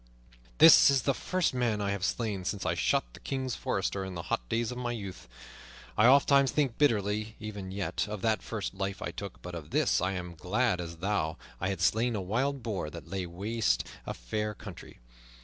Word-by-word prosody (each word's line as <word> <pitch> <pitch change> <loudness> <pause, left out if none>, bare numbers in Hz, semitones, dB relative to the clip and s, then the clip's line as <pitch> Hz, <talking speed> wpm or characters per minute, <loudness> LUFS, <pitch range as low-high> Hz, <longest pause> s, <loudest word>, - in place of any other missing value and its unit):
"This - - +9
is 135 -3 +3
the 140 - +2
first 185 +4 0
man 120 -4 0
I 100 -1 0
have 100 -2 -3
slain 105 -2 -1
since 100 +2 -3
I - - +2
shot - - 0
the - - -12
Kings 130 -2 -3
forester 95 -1 -1
in 95 -1 -6
the 85 - -4
hot - - -2
days 115 0 0
of 125 - -5
my 120 -1 -2
youth. 100 -6 -7 0.7
I 110 - +5
ofttimes 140 0 +6
think 135 -3 0
bitterly, 110 -5 +1
even 105 -3 -6
yet, 100 +2 -2
of 105 -2 -6
that 110 -3 +2
first 105 -5 -4
life 95 0 -3
I - - -3
took, 100 +2 -8
but 90 - -7
of 80 -3 -7
this - - +2
I 95 +2 0
am 90 -2 -5
as 80 - -20
glad 105 0 +1
as 85 -1 -7
though 90 -4 -1 0.2
I 95 - -1
had 95 -4 -3
slain 115 +5 +2
a - - -1
wild 130 +8 -1
boar 100 -9 -2
that 75 - -10
laid 95 -2 -2
waste 105 +6 0 0.2
a - - -3
fair 105 - -3
country. - - -10
105 Hz, 210 wpm, -30 LUFS, 95-120 Hz, 0.7 s, This